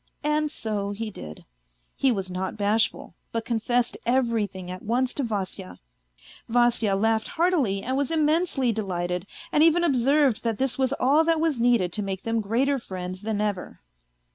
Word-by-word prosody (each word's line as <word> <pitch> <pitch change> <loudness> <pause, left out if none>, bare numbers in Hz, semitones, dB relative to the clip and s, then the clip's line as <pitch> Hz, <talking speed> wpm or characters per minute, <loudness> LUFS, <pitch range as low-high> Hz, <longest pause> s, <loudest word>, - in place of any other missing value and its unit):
And 300 0 +1
so 210 -6 -3
he 215 +2 -4
did; 75 - -10 0.5
he 270 - +2
was 190 -4 -3
not 185 +3 -3
bashful, 215 +2 +1 0.2
but 230 0 -3
confessed 240 +1 0
everything 225 -7 0
at 185 - -7
once 245 +4 0
to - - -2
Vasya. 195 -4 -4 0.7
Vasya 235 -3 +3
laughed 220 +2 +1
heartily 315 - +1
and 260 +2 -1
was 280 +1 0
immensely 310 -4 +2
delighted, 180 -4 -3 0.2
and 300 - +3
even 330 +2 +5
observed 275 -3 +3
that 230 -3 -1
this 265 -1 0
was 265 -1 +1
all 280 +4 +3
that 330 -1 +2
was 315 -6 0
needed 230 -7 +2
to 210 - -1
make 195 -1 -4
them 225 0 0
greater 260 +7 +1
friends 185 -3 -6
than 215 -1 -2
ever. 205 -3 -3
230 Hz, 165 wpm, -25 LUFS, 200-270 Hz, 0.7 s, even